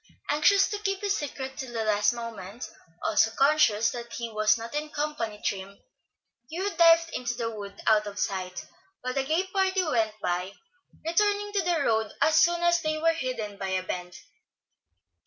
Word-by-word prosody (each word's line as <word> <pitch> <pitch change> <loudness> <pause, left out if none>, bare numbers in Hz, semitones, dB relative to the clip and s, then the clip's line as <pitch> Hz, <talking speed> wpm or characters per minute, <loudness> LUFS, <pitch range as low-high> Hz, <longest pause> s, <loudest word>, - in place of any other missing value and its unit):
Anxious 390 +7 +4
to 415 - -3
keep 390 -2 -2
his 405 -1 +1
secret 265 -4 -5
till 260 -3 -6
the 225 -1 -1
last 210 -1 +3
moment, 230 -2 -7 0.4
also 220 +1 +3
conscious 230 -4 +3
that 235 -1 -7
he 235 -1 -4
was 215 +1 +3
not 230 +3 -8
in 300 +1 -2
company 290 -9 -3
trim, 195 0 -4 0.7
Hugh 375 +5 -2
dived 330 0 +5
into 240 -1 -2
the 230 -1 -3
wood, 200 -2 -8
out 215 -1 +4
of 205 0 -7
sight, 185 -3 -3 0.4
while 255 0 -3
the 270 - 0
gay 320 +7 +1
party 380 -1 +2
went 225 -9 0
by, 180 +1 -2 0.5
returning 410 +4 +1
to 400 - +2
the 340 -3 +1
road 220 -4 +1
as 315 0 +5
soon 345 +1 +3
as 345 0 +3
they 310 -1 -1
were 330 +1 +3
hidden 240 -9 -4
by 195 - -3
a 190 -1 -1
bend. 180 -1 -5
250 Hz, 175 wpm, -27 LUFS, 215-330 Hz, 0.7 s, dived